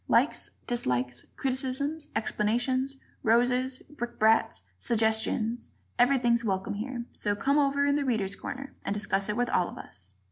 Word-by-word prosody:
Likes, - - +2 0.2
dislikes, 125 - -1
criticisms, 270 +4 -1
explanations, 245 +6 0 0.3
roses, 250 +3 +2
brickbats, 225 - +1 0.2
suggestions 220 - +1 0.3
everything's 245 -2 +4
welcome 190 -3 -1
here; 240 +3 -4
so 205 0 -1
"come 275 +8 +2
over 280 0 +2
in 285 - +3
'The 285 -1 +1
Readers' 210 -6 0
Corner'" 275 +1 -7
and 200 - -1
discuss 195 -1 +1
it 210 - -1
with 245 0 0
all 180 - +2
of - - -10
us! 95 -1 -12
235 Hz, 140 wpm, -28 LUFS, 210-265 Hz, 0.3 s, everything's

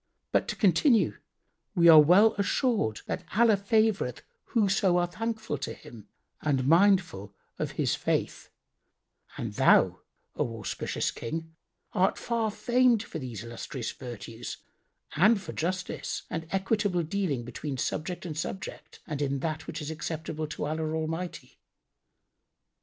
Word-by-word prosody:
But - - +2
to - - -3
continue: 215 - +3 0.6
we 170 -2 +5
are 160 -2 +11
well 185 +9 +6
assured 200 - +1
that 180 - -4
Allah 230 -2 +6
favoureth 215 +1 +1 0.2
whoso 195 -5 +2
are 175 - +3
thankful 215 - -4
to - - -4
Him 110 -4 -13 0.3
and 135 -4 +1
mindful 165 - +3 0.2
of - - -2
His - - 0
faith; - - -2 0.9
and - - -4
thou, - - +4 0.4
O 115 -1 -2
auspicious 110 - -2
King, 160 +6 -6 0.4
art 190 +2 +2
far 230 -2 -1
famed 240 +1 +3
for 165 - -7
these 120 -6 -6
illustrious 115 +1 -5
virtues 120 -2 -7 0.6
and 200 +7 +5
for 190 - -8
justice 180 +2 -3
and 160 -1 -4
equitable 195 -2 +1
dealing 160 -7 -1
between 135 +3 -5
subject 175 +7 -3
and 160 -3 -5
subject 180 +5 -6
and 145 -1 -4
in 140 -1 0
that 155 0 -3
which 165 -1 -5
is 150 - -4
acceptable 160 0 -4
to 150 - -4
Allah 155 +1 -2
Almighty. 165 +3 -4
165 Hz, 135 wpm, -28 LUFS, 150-200 Hz, 0.9 s, are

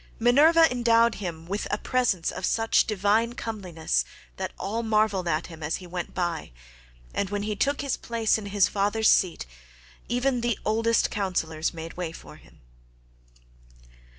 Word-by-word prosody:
Minerva 305 +8 +6
endowed 235 -1 +3
him 165 -4 -5
with 200 +4 -3
a 205 - 0
presence 235 -9 0
of 185 - -7
such 225 +4 +2
divine 215 +3 +1
comeliness 180 - -2 0.3
that - - -3
all 220 +4 -2
marvelled 215 -4 +1
at 155 0 0
him 165 -2 -11
as 150 +1 -1
he 185 - -8
went 175 0 -6
by, 175 - -2 0.6
and 200 - -1
when 205 0 -2
he 210 0 -2
took 280 +7 0
his 280 -2 -1
place 225 -2 0
in 205 - -7
his 200 -1 +3
father's 205 +2 +2
seat 180 - +1 0.6
even 245 +1 +1
the 235 -3 0
oldest 225 +1 +2
councillors 165 -5 -1
made 165 0 -8
way 175 -3 -3
for 155 - -12
him. 80 - -21
205 Hz, 155 wpm, -26 LUFS, 175-230 Hz, 0.6 s, Minerva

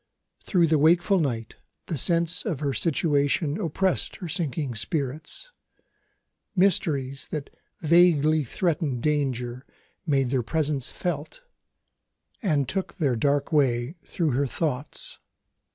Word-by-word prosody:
Through 175 -4 +3
the 155 -2 +2
wakeful 175 +5 +4
night 120 -8 -2 0.3
the 165 - -3
sense 170 +4 +1
of 175 - -2
her 140 -2 -1
situation 145 - +1
oppressed 185 +2 0
her 180 - -7
sinking 150 -5 -1
spirits. 150 - -3 1.0
Mysteries 145 -8 +1
that 150 -3 -5 0.3
vaguely 155 -2 +4
threatened 145 -3 -1
danger 130 -4 -1 0.4
made 135 -4 +2
their 130 -2 +2
presence 150 0 0
felt, 165 - -4 1.0
and 150 - +1
took 190 -1 -3
their 145 -9 +1
dark 140 +5 +1
way 130 -3 +2
through 165 -4 -1
her 135 +3 +1
thoughts. 145 0 -4
150 Hz, 115 wpm, -26 LUFS, 135-170 Hz, 1.0 s, wakeful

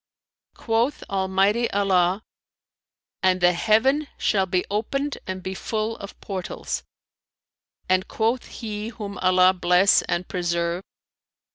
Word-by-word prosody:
"Quoth 235 +5 0
Almighty 195 +4 +2
Allah, 190 0 +2 1.0
'And 185 -1 +3
the 180 0 +4
heaven 245 - +2
shall 190 -2 +1
be 180 0 0
opened 275 +7 -2
and 185 0 -5
be 190 0 -4
full 220 +3 -2
of 200 - -10
portals;'[FN#339] 190 -3 -4 1.0
and 185 0 +2
quoth 230 +3 -1
he 215 -2 -5
whom 210 -4 -7
Allah 185 0 +5
bless 180 +2 +4
and 175 0 -2
preserve! 170 0 -1
195 Hz, 115 wpm, -24 LUFS, 185-220 Hz, 1.0 s, Allah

